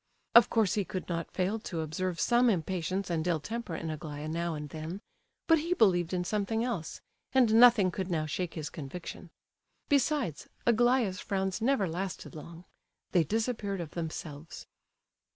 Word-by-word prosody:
Of 235 -2 +8
course 220 -4 +2
he 210 -3 +1
could 185 0 -5
not 170 -1 -3
fail 190 +4 -1
to 170 -6 -4
observe 165 +2 -3
some 240 +8 +4
impatience 185 0 -1
and 165 0 -1
ill 170 -3 +2
temper 225 +1 -5
in 160 0 -4
Aglaya 150 -1 -6
now 170 +1 -2
and 150 0 -5
then; 160 +5 -6 0.5
but 325 -1 +5
he 340 +4 0
believed 175 - +3
in 180 -1 0
something 215 +4 -1
else, 225 -11 -3 0.3
and 250 -4 +4
nothing 225 -5 +7
could 190 +1 -4
now 160 -3 0
shake 170 +3 -3
his 155 -3 -4
conviction. 170 +4 -7 0.6
Besides, 275 - +1 0.2
Aglaya's 235 -4 +3
frowns 190 0 -2
never 230 -5 +2
lasted 180 +3 -5
long; 170 +2 -10 0.5
they 175 - +4
disappeared 215 - -1
of 165 -3 -5
themselves. 160 -2 -6
185 Hz, 160 wpm, -30 LUFS, 165-225 Hz, 0.6 s, Of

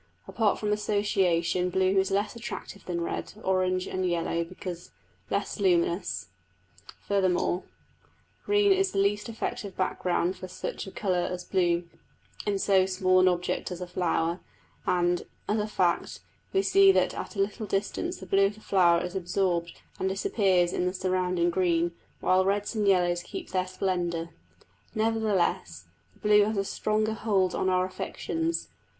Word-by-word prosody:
Apart 220 -3 +1
from 210 -1 0
association 185 -4 +1
blue 190 +1 +2
is 190 - +1
less 200 +3 0
attractive 230 -4 -7
than 170 -1 -2
red, 170 - -4
orange, 185 -1 +1
and 185 - -3
yellow, 170 -1 0
because 180 0 -8 0.4
less - - -2
luminous; 175 - +1 0.7
furthermore 185 -2 +1 0.8
green 415 -1 +3
is 390 0 +3
the - - -2
least 205 +3 +1
effective 210 -3 -4
background 180 -1 0
for 185 - -8
such 185 - -5
a - - -7
colour 185 -4 0
as 180 0 -4
blue 175 -2 +1 0.6
in 205 -1 +1
so 190 -1 +3
small 185 0 +3
an 185 - +5
object 180 0 0
as 180 - -5
a 180 - -4
flower; 175 -1 0 0.5
and, 175 0 +1 0.2
as 215 +1 +1
a 210 - -1
fact, 180 -5 0 0.3
we 385 0 +2
see 390 0 +6
that - - +2
at - - -6
a - - -5
little 210 +2 -1
distance 210 - -2
the - - -9
blue 195 0 +4
of 205 - -6
the - - -15
flower 175 -5 +3
is 180 - -6
absorbed 175 -2 0 0.3
and 190 - 0
disappears 190 -2 +2
in 180 - 0
the 180 - -1
surrounding 185 -2 +1
green, 170 -1 +1 0.3
while 185 0 +3
reds 200 +3 0
and 210 -2 0
yellows 175 -2 +3
keep - - -8
their 185 0 0
splendour. 175 -3 -2 0.7
Nevertheless 210 - 0 0.3
the - - -24
blue 210 -1 +5
has 215 0 -2
a 195 - 0
stronger 215 +2 0
hold 195 -5 +1
on 190 - 0
our 185 0 +2
affections. 325 - -3
185 Hz, 160 wpm, -28 LUFS, 180-205 Hz, 0.8 s, see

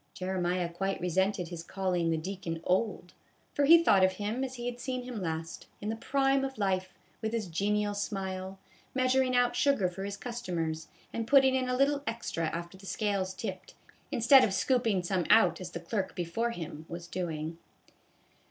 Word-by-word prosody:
Jeremiah 180 -1 -1
quite 195 +3 -2
resented 180 +1 0
his 170 -2 -6
calling 180 -1 -1
the 165 - +1
deacon 170 -1 -4
old, 185 -1 0 0.4
for 285 - +2
he 335 +3 +8
thought 195 - +5
of 185 0 +4
him 210 +6 -2
as 260 -1 -4
he 240 -1 -6
had 245 0 -4
seen 255 -1 -3
him 245 -4 -5
last, 160 -1 -4
in 210 - -4
the 220 - -1
prime 270 +3 +1
of 270 -1 -4
life, 190 -2 0 0.3
with 220 0 -2
his 225 -3 -1
genial 205 +4 0
smile, 190 -2 -4 0.4
measuring 255 0 +2
out 245 0 +3
sugar 275 -10 +3
for 190 +2 -7
his 200 0 -4
customers, 175 -10 -3 0.3
and 230 -1 -3
putting 265 -1 +6
in 260 -1 0
a 250 - +1
little 280 +1 +3
extra 225 -7 -2
after 170 +3 -5
the 195 - -12
scales 195 -3 -1
tipped, 190 -3 -6 0.4
instead 255 +3 +7
of 195 - +1
scooping 230 -6 +2
some 180 -1 0
out 225 - +5
as 180 - -5
the 170 - -6
clerk 190 +3 -3
before 180 +7 -1
him 160 -6 -7
was 170 0 -6
doing. 165 -2 -4
195 Hz, 180 wpm, -30 LUFS, 180-240 Hz, 0.4 s, he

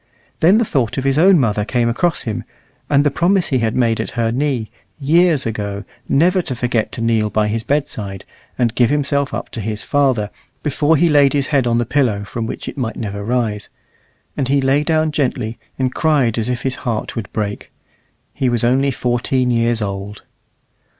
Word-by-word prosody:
Then 180 +6 +5
the 235 - +2
thought 130 - -1
of 135 - -1
his 135 +2 +2
own 185 +2 +6
mother 105 -5 +1
came 120 +2 0
across 165 +9 0
him, 110 -3 -3 0.5
and 140 0 +4
the 145 - +2
promise 175 +6 +1
he 130 - +1
had 115 -1 0
made 115 -3 +2
at - - -4
her 115 -1 +1
knee, 125 -3 -1 0.3
years 160 +1 +3
ago, 100 -2 -3 0.3
never 180 +6 +3
to 135 -7 -5
forget 120 -2 -1
to - - -5
kneel 115 -2 +1
by 105 0 +1
his 110 +2 -1
bedside, 110 -8 -2 0.3
and 120 -3 +1
give 120 -2 +3
himself 140 -1 0
up - - -5
to 115 - -6
his 105 0 -4
Father, 130 -8 +1 0.3
before 150 +2 +2
he 170 - +4
laid 145 -3 +4
his 140 -2 0
head 135 -3 +3
on 115 0 +2
the 120 - +1
pillow, 115 -6 +1
from 110 +2 -4
which - - -6
it - - -6
might 115 -3 -2
never 100 -2 -4
rise; 110 -2 -1 0.7
and 135 - -1
he 140 +1 +2
lay 135 +2 +2
down 155 0 +1
gently, 125 -6 -2 0.2
and 130 -1 -1
cried 140 -8 +2
as 110 +2 -1
if 125 -1 -2
his 130 -1 -2
heart 115 -4 -3
would 115 -4 -5
break. 105 -2 -4 0.6
He 130 - 0
was 120 -1 0
only 130 +4 +3
fourteen 125 0 0
years 115 -1 +1
old. 100 +1 -5
125 Hz, 195 wpm, -18 LUFS, 110-140 Hz, 0.7 s, own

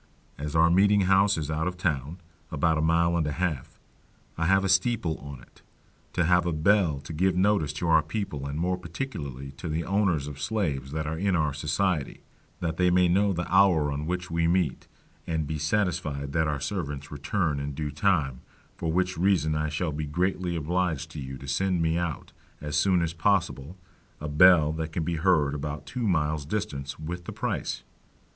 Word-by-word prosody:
As 75 +1 -4
our 80 +1 +5
meeting 100 +3 +4
house 95 +1 +4
is 75 -1 -3
out 80 +2 -1
of 90 0 -4
town 75 -2 -2 0.3
"(about 80 +1 +1
a - - +1
mile 85 +2 +2
and 80 -3 +1
a 75 - -2
half)," 80 -5 -3 0.6
I 85 +1 -1
have 95 +1 +4
a - - +1
steeple 95 -3 +1
on 70 -2 -9
it, - - -22 0.5
to 90 - +1
have 90 +1 +3
a - - +1
bell 80 -1 +2
to 80 - -8
give 90 +3 +1
notice 95 -5 +2
to 80 +3 -3
our 80 -1 +5
people 80 -4 -4
and 70 +2 -4
more 90 +2 0
particularly 75 - -6
to 85 - -5
the 80 +2 -1
owners 95 -6 +1
of 75 -1 -8
Slaves 75 -7 -2
that 80 +1 -3
are 80 +1 -3
in 95 0 +1
our 75 -4 +1
society, 75 +2 -1 0.4
that 80 -2 -2
they 90 -1 +3
may 90 0 +4
know 100 +3 +3
the 90 -1 -2
hour 90 -7 +4
on 75 +2 -3
which 90 0 -3
we 85 0 +1
meet, 85 -5 0 0.4
and 80 -2 -1
be 75 +1 -4
satisfied 75 -5 -1
that 80 -1 +2
our 75 -2 -1
servants 75 -2 -4
return 75 +1 -1
in 70 0 -4
due 75 0 -3
time; 75 -6 +1 0.4
for 80 - -2
which 90 0 0
reason 85 -5 +2
I 75 0 -1
shall 80 +2 -2
be 75 +1 -4
greatly 90 +3 -1
obliged 80 -1 -1
to 80 - -7
you 65 -1 -6
to 70 - -10
send 90 +6 0
me 80 +1 +1
out, 85 -5 -4 0.3
as 75 0 -4
soon 90 +3 +3
as 85 0 -2
possible, 85 -3 0 0.4
a 75 - -5
bell 75 0 +6
that 80 0 -4
can 85 - -1
be 85 +1 -2
heard 80 -5 +2
about 75 0 -5
two 120 -3 -3
miles 80 -4 +1
distance, 70 -5 -4
with 85 +3 -6
the - - -5
price. - - -3
80 Hz, 200 wpm, -27 LUFS, 75-90 Hz, 0.6 s, bell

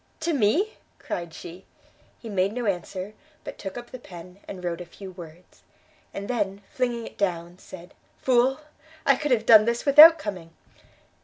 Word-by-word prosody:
"To 335 +1 -1
me?" 295 - +1 0.2
cried 170 -2 -6
she. 175 +3 -11 0.6
He 230 - -10
made 195 -1 0
no 245 0 -4
answer, 190 +1 -4 0.3
but - - -9
took 195 +2 -7
up 240 0 -9
the 255 - -8
pen, 180 -2 -13
and 185 -2 -8
wrote 175 0 -3
a - - -7
few 190 +2 -11
words, 175 -1 -14 0.5
and 200 0 -7
then, 205 -4 -3
flinging 240 -2 -2
it - - -12
down, 175 -2 -2
said, 180 -1 -13 0.3
"Fool! 260 +3 +2 0.4
I 275 - +5
could 295 +2 -3
have 230 -4 +1
done 215 -2 +7
this 235 +1 -1
without 305 +4 +9
coming!" 180 -6 -7
205 Hz, 170 wpm, -25 LUFS, 180-245 Hz, 0.6 s, without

